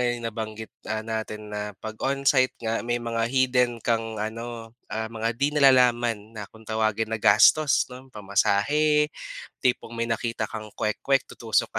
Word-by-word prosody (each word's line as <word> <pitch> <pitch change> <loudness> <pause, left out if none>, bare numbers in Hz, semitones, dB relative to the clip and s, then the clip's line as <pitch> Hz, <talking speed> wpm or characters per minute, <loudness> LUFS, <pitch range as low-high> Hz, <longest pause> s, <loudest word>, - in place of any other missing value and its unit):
nga 125 - +1
'yung 120 -1 -3
nabanggit, 110 -1 -5 0.2
ah, 110 0 -2
natin 110 -1 -5
na 105 -1 -4
pag 110 - -5
on-site 135 -1 +2
nga 115 +1 0
may 120 0 +1
mga 115 -1 -2
hidden 125 -2 +2
kang 115 -1 -1
ano, 115 +1 -5 0.2
ah, 110 +1 -3
mga 115 0 -2
di 140 +4 +1
nalalaman 120 -6 +3
na 105 -3 -8
kung 110 0 -17
tawagin 110 0 -1
na 110 - -2
gastos 115 +8 +5
'no, 130 +1 -11
pamasahe, 145 +9 +1 0.5
tipong 125 -2 0
may 115 0 -1
nakita 115 0 -2
kang 110 0 -6
kwek-kwek, 135 +5 0
tutusok 115 -2 0
115 Hz, 160 wpm, -25 LUFS, 110-125 Hz, 0.5 s, gastos